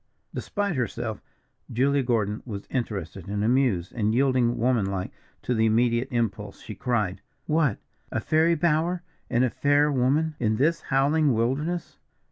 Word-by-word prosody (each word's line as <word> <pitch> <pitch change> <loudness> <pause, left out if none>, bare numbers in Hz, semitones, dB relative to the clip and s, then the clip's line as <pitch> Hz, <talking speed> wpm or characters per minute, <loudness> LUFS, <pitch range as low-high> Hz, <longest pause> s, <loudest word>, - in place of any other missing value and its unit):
Despite 205 -4 -2
herself, 115 -3 -3 0.5
Julia 140 +4 +2
Gordon 110 -4 0
was 100 -5 -6
interested 100 -7 -4
and 100 +1 -2
amused, 115 -7 +2
and 110 -1 0
yielding, 125 -2 +2
womanlike 100 -6 0 0.3
to 125 - 0
the 110 -1 +3
immediate 120 +2 +2
impulse, 110 -5 -2
she 110 - -8
cried: 105 -6 -1 0.2
"What! 150 -7 +2 0.3
a - - 0
fairy 160 +2 +3
bower, 170 +2 +1 0.3
and 120 - +2
a 125 - +1
fair 145 +1 +3
woman, 140 +5 +2
in 110 -2 +1
this 160 +8 +1
howling 140 0 +2
wilderness?" 145 +10 -1
125 Hz, 140 wpm, -26 LUFS, 110-145 Hz, 0.5 s, the